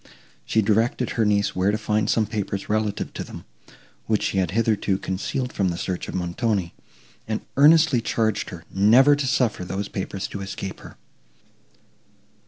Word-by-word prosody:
She 110 - +2
directed 115 +4 +1
her 115 - +1
niece 100 -1 +1
where 95 +2 +2
to 105 - +1
find 105 -1 0
some 110 - +2
papers 100 -2 -4
relative 105 -1 -1
to - - -4
them, - - -10 0.6
which 110 -2 +1
she 95 - 0
had 95 - +1
hitherto 105 -2 +1
concealed 105 +7 -3
from 95 -2 +1
the 85 - -3
search 90 0 -3
of - - -6
Montoni, 90 +1 -1 0.5
and 110 -1 -3
earnestly 150 -2 +5
charged 110 -2 -1
her 85 -1 -10
never 120 +9 +6
to 140 -2 -2
suffer 125 -8 +1
these 95 +3 -4
papers 95 0 -4
to 100 - -6
escape 100 -1 -6
her. - - -13
105 Hz, 165 wpm, -23 LUFS, 95-115 Hz, 0.6 s, never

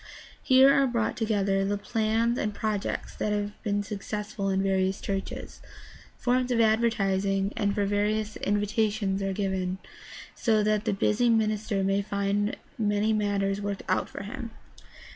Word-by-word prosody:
Here 265 +1 +6
are 275 -1 +4
brought 235 -3 0
together 200 -3 +1
the 205 +1 0
plans 225 +3 0
and 210 -1 -2
projects 215 -2 -2
that 210 - -1
have 205 0 -1
been 205 -2 -1
successful 210 0 -4
in 190 0 +1
various 190 0 +1
churches. 195 -1 -5 0.6
Forms 250 0 +1
for 235 - +2
advertising 200 -3 +2
and 200 -1 0
for 205 -2 +1
various 210 +1 0
invitations 205 -1 0
are 195 0 -1
given, 190 -2 -2 0.6
so 220 -3 +2
that 215 0 +1
the - - +1
busy 210 +4 +2
minis 215 -1 +1
ter 195 -3 +1
may 195 +1 +2
find 200 +1 -1 0.2
many 210 0 +1
matters 200 -1 0
worked 200 -1 -3
out - - 0
for - - -7
him. 230 +3 -6
205 Hz, 150 wpm, -27 LUFS, 195-220 Hz, 0.6 s, Here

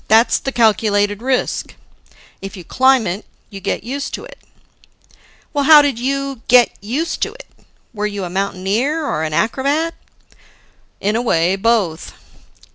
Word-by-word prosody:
"That's 225 +2 +4
the 270 - -4
calculated 205 -3 +2
risk. 255 0 -1 0.7
If 195 +1 -8
you 180 - -9
climb, 260 +4 +3 0.5
you 195 - -8
get 190 - -3
used 275 +4 -4
to - - -9
it." - - -14 1.1
"Well, 285 -2 0
how 300 -1 +9
did 275 -5 -1
you 275 0 -2
get 245 -1 +6
used 275 +11 -3
to - - -1
it? - - -12 0.5
Were 210 -1 -2
you 205 -2 -5
a 180 - -4
mountaineer 200 - -1
or 155 - -2
an 155 -1 -2
acrobat?" 280 - 0 1.1
"In 205 +2 0
a 235 - +1
way, 180 -5 +2
both." 195 -6 0
230 Hz, 145 wpm, -18 LUFS, 200-275 Hz, 1.1 s, how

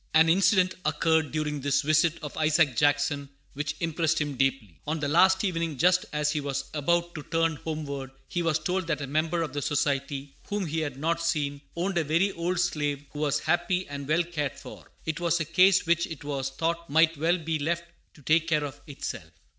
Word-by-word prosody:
[An 160 +1 +6
incident 185 +1 +4
occurred 160 +1 +1
during 150 -2 -2
this 140 0 +1
visit 155 +2 +3
of 150 - -6
Isaac 155 -3 +3
Jackson 145 +1 +1 0.2
which 145 +1 -3
impressed 160 -1 0
him 150 -2 -1
deeply. 130 - -1
On 155 +1 -1
the 145 - -1
last 190 +6 +4
evening, 165 -6 -1
just 180 +4 +3
as 150 0 0
he 150 -1 -1
was 140 -1 -4
about 170 +3 0
to 155 - -6
turn 165 +1 0
homeward, 145 -4 -5 0.2
he 175 - -2
was 165 -2 +2
told 180 +3 -2
that 165 - -1
a - - -2
member 160 +4 0
of 150 -5 -5
the 145 - -2
Society 140 -1 -1
whom 205 -2 -2
he 160 0 -2
had 145 -4 -3
not 165 +3 0
seen 145 -4 -1
owned 175 +1 0
a - - +1
very 165 +7 +2
old 175 0 -2
slave 145 -5 -1
who 145 - -7
was 145 -1 +1
happy 180 +1 0
and 140 -1 -6
well 160 +3 +3
cared 155 -5 -3
for. - - -12
It 160 +1 -2
was 170 -1 +1
a 160 - -1
case 185 +4 +4
which 170 0 +2
it 160 -3 -8
was 140 -2 -2
thought 170 +4 -2
might 160 +2 +4
well 165 +4 +2
be 160 -2 -2
left 170 +3 -1 0.3
to 145 - -17
take 160 +3 +3
care 155 -3 +2
of 145 -2 -7
itself. 145 - -6
155 Hz, 210 wpm, -27 LUFS, 145-170 Hz, 0.3 s, An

